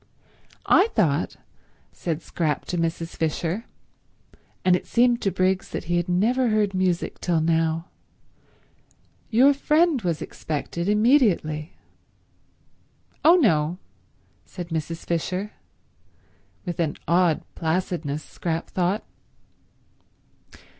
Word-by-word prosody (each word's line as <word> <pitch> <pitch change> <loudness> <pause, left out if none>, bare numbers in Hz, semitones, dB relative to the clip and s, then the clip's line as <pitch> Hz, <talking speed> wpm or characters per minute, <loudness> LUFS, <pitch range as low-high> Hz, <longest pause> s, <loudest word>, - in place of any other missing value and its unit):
"I 390 - +5
thought," 165 -8 +1 0.6
said 165 -2 -4
Scrap 155 -4 -2
to 180 - -3
Mrs. 165 0 -2
Fisher, 165 +6 -2 1.0
and 180 -1 +5
it - - -4
seemed 240 0 +3
to 195 - +1
Briggs 185 +1 0
that - - -4
he 175 +1 0
had 175 +1 -1
never 235 +8 +2
heard 215 -3 +1
music 185 -2 -1
till 170 -2 +1
now, 165 0 +1 1.4
"your 255 +5 +5
friend 300 0 +2
was 170 -5 -1
expected 170 +4 -4
immediately." 210 - +2 1.5
"Oh, 330 +3 +8
no," 170 - +2 0.7
said 175 -2 -8
Mrs. 165 0 -4
Fisher—with 180 0 -7
an 160 -3 0
odd 170 -2 +3
placidness, 160 -3 -2
Scrap 165 -1 -4
thought. 185 +4 0
175 Hz, 100 wpm, -24 LUFS, 165-210 Hz, 1.5 s, Oh